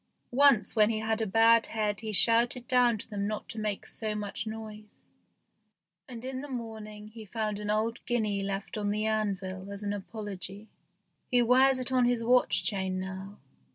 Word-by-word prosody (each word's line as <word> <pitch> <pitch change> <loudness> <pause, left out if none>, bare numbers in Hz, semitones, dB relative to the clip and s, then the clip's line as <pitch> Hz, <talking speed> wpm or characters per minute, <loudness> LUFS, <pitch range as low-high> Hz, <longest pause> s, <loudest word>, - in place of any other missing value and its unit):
Once 260 -6 +4
when 215 -1 +5
he 225 - -1
had 220 +1 -1
a 220 - 0
bad 225 +3 +5
head 210 -2 -1
he 220 -1 -4
shouted 235 +4 +5
down 245 -3 +3
to - - -8
them 200 -1 -2
not 215 0 -4
to 220 - -6
make 210 -2 -3
so 215 -2 -3
much 210 +1 -4
noise, 215 -1 -7 1.2
and 240 -1 -8
in 260 0 -4
the 290 - -7
morning 215 -4 -7
he 220 0 -11
found 215 -1 -3
an 210 0 -5
old 220 +2 -1
guinea 215 -5 0
left 195 +2 -4
on 205 -1 -1
the 210 +1 -1
anvil 200 -3 -2
as 200 +1 -7
an 205 0 -2
apology. 205 -1 -7 0.6
He 245 -2 +4
wears 260 +2 +5
it 255 0 -2
on 255 -1 +3
his 240 -1 +1
watch 250 +2 +3
chain 190 -3 -1
now. 190 +2 -7
215 Hz, 185 wpm, -29 LUFS, 205-230 Hz, 1.2 s, when